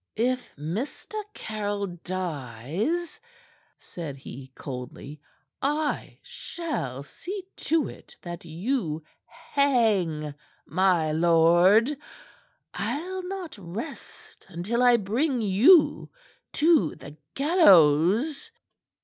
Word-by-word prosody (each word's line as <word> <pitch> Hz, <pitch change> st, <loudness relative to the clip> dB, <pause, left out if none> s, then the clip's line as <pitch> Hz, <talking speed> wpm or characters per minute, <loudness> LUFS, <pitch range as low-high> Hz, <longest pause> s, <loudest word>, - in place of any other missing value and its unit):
"If 250 Hz, +2 st, -1 dB
Mr. 175 Hz, -, -5 dB, 0.2 s
Caryll 205 Hz, -2 st, -3 dB
dies," 175 Hz, -, -4 dB, 0.6 s
said 155 Hz, -6 st, -8 dB
he 130 Hz, 0 st, -10 dB
coldly, 135 Hz, +2 st, -8 dB, 0.4 s
"I 295 Hz, +2 st, -1 dB
shall 140 Hz, -, -5 dB
see 375 Hz, -, -7 dB
to 320 Hz, 0 st, +1 dB
it -, -, -12 dB
that 175 Hz, -1 st, -7 dB
you 170 Hz, -, -2 dB, 0.2 s
hang, 220 Hz, -, +1 dB, 0.3 s
my 175 Hz, -3 st, +2 dB
lord. 175 Hz, -, +5 dB, 0.8 s
I'll 365 Hz, +4 st, -3 dB
not 375 Hz, -3 st, -6 dB
rest 195 Hz, -, -9 dB
until 190 Hz, +7 st, -2 dB
I 245 Hz, -1 st, +6 dB
bring 240 Hz, +7 st, 0 dB
you 230 Hz, -, +5 dB, 0.4 s
to 310 Hz, -, +3 dB
the 145 Hz, +2 st, -11 dB, 0.2 s
gallows." 245 Hz, -, +4 dB
200 Hz, 85 wpm, -26 LUFS, -, 0.8 s, I